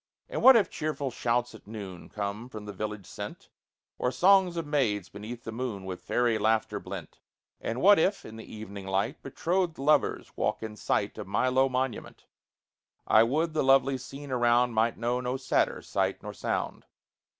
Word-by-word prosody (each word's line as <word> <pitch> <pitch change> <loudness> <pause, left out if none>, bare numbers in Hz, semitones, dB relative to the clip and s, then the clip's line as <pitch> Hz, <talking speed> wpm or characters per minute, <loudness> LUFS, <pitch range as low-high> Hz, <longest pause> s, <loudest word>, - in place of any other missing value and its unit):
And - - -3
what 265 0 +9
if 210 -6 +4
cheerful 150 -3 -3
shouts 120 0 0
at 110 - -14
noon 100 -5 -8
Come, 105 +3 -4
from 110 -4 -8
the 105 - -7
village 105 0 -5
sent, - - -8 0.5
Or 125 - +1
songs 185 +4 +4
of 165 - -2
maids 120 - 0
beneath 110 +4 -8
the 115 - -5
moon, 110 -5 -4
With 95 -1 -6
fairy 120 -2 +1
laughter 110 +1 +1
blent? - - -8 0.4
And 115 +3 -3
what 205 0 +7
if, 195 +5 +1
in 110 - -9
the 110 - -10
evening 100 -2 -8
light, 100 +9 -1
Betrothed 175 -1 -1
lovers 145 +1 +1
walk - - -1
in 110 -1 -5
sight - - -1
Of - - -6
my 130 - +1
low 130 +1 +3
monument? 130 -2 -3 0.8
I 110 - +6
would 155 +8 +1
the 155 - +1
lovely 135 0 +4
scene 135 +2 -9
around 120 0 +3
Might 115 +1 +2
know 120 +2 -1
no 125 +1 -2
sadder 130 0 0
sight - - -1
nor - - -6
sound. - - -3
120 Hz, 180 wpm, -28 LUFS, 110-140 Hz, 0.8 s, what